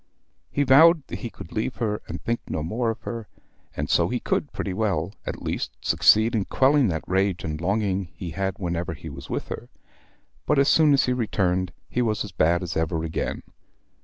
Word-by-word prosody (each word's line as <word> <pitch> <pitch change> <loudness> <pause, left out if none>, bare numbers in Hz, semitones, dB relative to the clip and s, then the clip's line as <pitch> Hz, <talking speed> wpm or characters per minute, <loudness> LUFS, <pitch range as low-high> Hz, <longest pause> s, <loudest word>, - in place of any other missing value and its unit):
He 145 - +1
vowed 155 +3 +6
that - - -5
he 120 - -5
could - - -11
leave 115 +3 -2
her 105 -3 -2
and - - -5
think 115 0 -1
no 75 - -3
more 115 +8 -1
of 115 - -4
her, 115 -2 -5 0.5
and 75 - -1
so - - +3
he - - -1
could - - -1
pretty 95 - -3
well, 95 -3 -1
at - - -5
least, - - -3
succeed 110 +3 +4
in 105 -4 +1
quelling 135 -1 +3
that 80 -4 -2
rage 95 -1 0
and 75 0 -4
longing 100 +1 0
he 90 -3 -6
had 95 +2 -2
whenever 85 -2 -3
he 80 - -9
was 70 - -10
with - - -3
her; - - -6 0.8
but 150 - +3
as 140 +1 +4
soon 155 -2 +5
as 135 - +4
he 125 - +1
returned 95 -7 0 0.2
he 125 - -1
was 110 -3 0
as 105 - -8
bad 85 +1 +2
as 85 - -4
ever 80 0 0
again. 80 -1 -3
100 Hz, 205 wpm, -25 LUFS, 85-120 Hz, 0.8 s, vowed